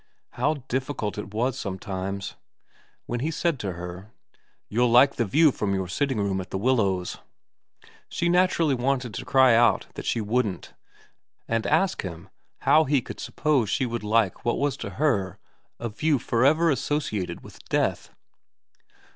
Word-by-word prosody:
How 145 +6 0
difficult 130 -5 -3
it 100 - -7
was 125 +4 -1
sometimes. 95 -1 -4 0.7
When 120 - -3
he 150 +6 -1
said 165 -2 -1
to 95 -5 -3
her, 90 +3 -8 0.3
' - - -42
You'll 120 +3 +2
like 125 +4 +5
the 120 - +1
view 155 +9 +4
from 100 -5 -1
your 95 -1 -2
sitting 135 +7 -1
room 100 -2 0
at 90 - -10
The - - -3
Willows,' 100 -6 0 0.9
she 170 - -1
naturally 175 -4 +3
wanted 125 -2 -1
to - - -6
cry 130 -2 +5
out 115 +1 +4
that - - -7
she - - +1
wouldn't, 105 -3 -2 0.7
and 115 -1 -1
ask 165 +5 +2
him 85 -3 -8 0.3
how 155 +1 +5
he 140 0 +2
could - - -9
suppose 140 -9 0
she 130 - +1
would 120 -2 -4
like 105 -2 +1
what 120 - 0
was 145 -2 0
to - - -5
her 105 - +1 0.4
a 120 - -3
view 150 +7 +1
for 115 0 0
ever 160 +4 +4
associated 135 -8 -2
with - - -14
death - - 0
120 Hz, 165 wpm, -25 LUFS, 100-140 Hz, 0.9 s, like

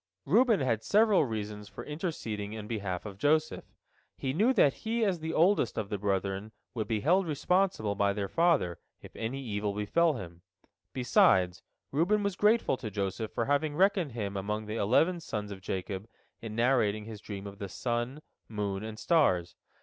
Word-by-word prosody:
Reuben 225 - +4
had 115 -4 0
several 210 -5 +4
reasons 105 -3 -5
for - - -9
interceding 115 - -4
in 110 -1 -6
behalf 100 -5 -3
of 100 -2 -8
Joseph. 155 +5 +1 0.5
He 130 -1 -2
knew 215 - +3
that 165 - +4
he 225 0 0
as 185 -4 0
the 160 +1 -3
oldest 170 - +2
of 100 - -2
the 105 -2 -3
brethren 100 +1 -2 0.2
would 110 -4 -3
be 110 -3 -1
held 180 - +3
responsible 160 - +1
by 100 0 +2
their 100 -1 -2
father, 160 - +2 0.2
if - - -12
any 130 +5 -4
evil 105 -3 -2
befell 155 +11 +2
him. 85 -8 -8 0.5
Besides, 95 -8 +3 0.3
Reuben 185 +9 +2
was 200 -2 -1
grateful 210 - +3
to 110 - -5
Joseph 100 +2 -3
for 115 - -1
having 145 +2 +1
reckoned 185 - +2
him 100 -4 -4
among 105 +2 -3
the 105 +1 -4
eleven 160 - +3
sons 105 -10 -5
of 95 -1 -8
Jacob 95 +2 -4 0.3
in 110 -2 -6
narrating 115 -4 +2
his 110 -2 -9
dream 100 -2 -7
of 100 0 -9
the 100 -2 -5
sun, 120 +7 -3 0.3
moon, 100 -2 -3
and 110 0 -6
stars. 95 - +2
110 Hz, 175 wpm, -30 LUFS, 100-160 Hz, 0.5 s, Reuben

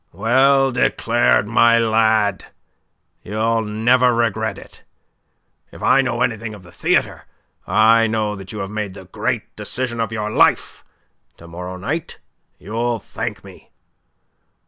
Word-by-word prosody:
"Well 135 +7 +3
declared, 120 -3 +1
my 115 +1 +4
lad. 110 -3 +2 0.8
You'll 110 +3 -1
never 120 +3 +2
regret 110 -3 -1
it. - - -14 0.9
If - - -12
I 135 - +4
know 120 -2 -1
anything 110 -2 -3
of 100 - -14
the 85 - -16
theatre, - - -1 0.4
I 115 +1 +4
know 110 -1 -1
that 95 -1 -10
you 110 - -7
have 95 - -10
made 105 -3 -4
the 95 - -11
great 90 - -4
decision 120 -2 -4
of 115 -1 -2
your 105 -1 -3
life. - - +1 0.5
To 85 - -14
morrow 90 +2 -7
night 145 - -4 0.4
you'll 115 +4 -2
thank - - -6
me." - - -15
110 Hz, 135 wpm, -19 LUFS, 105-120 Hz, 0.9 s, my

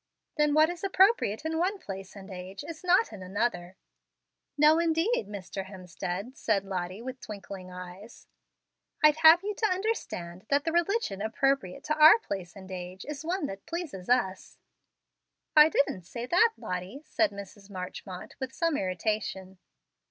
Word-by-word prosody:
Then 300 -1 +2
what 310 +2 +5
is 350 +1 -9
appropriate 380 - +3
in 320 0 -1
one 380 +4 +1
place 195 - -8
and 195 0 -10
age 185 +2 -7
is 330 0 -8
not 365 - +3
in 200 - -9
another." 185 -2 -2 0.8
"No, 305 +2 +6
indeed, 330 - +1
Mr. 195 -1 -6
Hemstead," 190 +4 -6
said 210 -9 0
Lottie, 185 +2 -4
with 260 0 -7
twinkling 195 -4 -8
eyes. 180 +4 -10 0.8
"I'd 305 0 +6
have 320 +3 +8
you 420 +1 -2
to 435 +2 +1
understand 225 - -3
that 285 0 +3
the 325 - -1
religion 345 - 0
appropriate 225 -2 0
to 305 - -1
our 310 +8 +10
place 195 - -6
and 190 -1 -11
age 185 0 -7
is 295 0 -6
one 345 0 -1
that 195 -6 -7
pleases 320 - -5
us." 215 -7 0 1.0
"I 305 0 +9
didn't 185 - 0
say 235 +6 -5
that, 440 - +4
Lottie," 185 +10 -5
said 320 0 +2
Mrs. 200 0 -11
Marchmont, 185 -1 -7
with 265 -1 -4
some 330 -3 +1
irritation. 190 0 -3
220 Hz, 155 wpm, -29 LUFS, -, 1.0 s, our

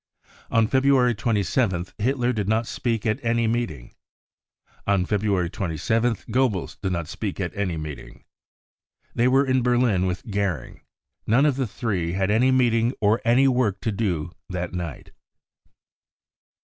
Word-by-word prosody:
On 115 -1 +3
February 130 0 +3
27th 100 -3 0
Hitler 125 +2 +1
did 105 -4 -2
not 110 +1 +1
speak 115 -1 -2
at, 110 -1 -1
any 115 0 +1
meeting. 110 - -2 0.9
On 100 -2 +2
February 100 -3 0
27 110 +7 0
th - - -21
Goebbels 115 -6 -1
did 95 -3 -1
not 85 -3 -2
speak 100 +3 -5
at 90 -2 -3
any 95 -5 -2
meeting. 75 -2 -8 0.9
They 120 - +2
were 135 +2 +4
in 130 -1 +2
Berlin 120 -6 +2
with 90 +4 -4
Goering. 95 -9 -2 0.5
None 125 +7 +4
of 145 -3 +2
the 130 -2 -1
three 100 -7 -2
had 95 +1 0
any 120 +5 +3
meeting 120 -1 +2
or 110 +2 +2
any 125 +4 +4
work 125 -7 +1
to 110 - -1
do 90 -7 -2 0.2
that 90 -1 -4
night. 85 -6 -6
110 Hz, 150 wpm, -24 LUFS, 95-120 Hz, 0.9 s, were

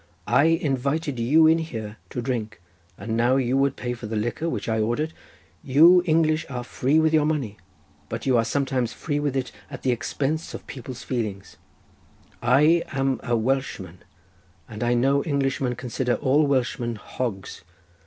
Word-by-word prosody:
I 145 - +4
invited 145 -2 0
you 150 +8 +5
in 160 +1 +5
here 110 -9 -6
to 120 - -4
drink, 110 -4 -3 0.4
and 110 +3 -4
now 120 +3 +3
you 130 -1 +1
would 135 0 +2
pay 120 -1 -3
for 120 -2 -7
the 110 - -4
liquor 120 +10 -2
which - - -4
I 110 -1 0
ordered. 120 +9 -1 0.5
You 165 +7 +6
English 155 -1 +2
are 125 -2 -4
free 130 +4 0
with 160 0 +3
your 155 -1 +4
money, 135 -10 -2 0.5
but - - -5
you 130 -2 +3
are 115 - +4
sometimes 130 -1 -1
free 145 -3 -2
with 145 -2 -1
it 130 -1 -2 0.2
at 135 - -9
the 130 - +2
expense 145 +6 -2
of - - -9
people's 125 -2 -8
feelings. 105 -6 -4 0.8
I 150 +8 +4
am 135 -2 -1
a 120 0 0
Welshman, 110 -8 -2 0.7
and 110 +1 -6
I 120 0 +2
know 135 +3 +2
Englishmen 135 -4 -1
consider 125 0 -1
all 145 +3 +2
Welshmen 120 -3 0
hogs. 105 -2 -5
130 Hz, 165 wpm, -24 LUFS, 120-145 Hz, 0.8 s, You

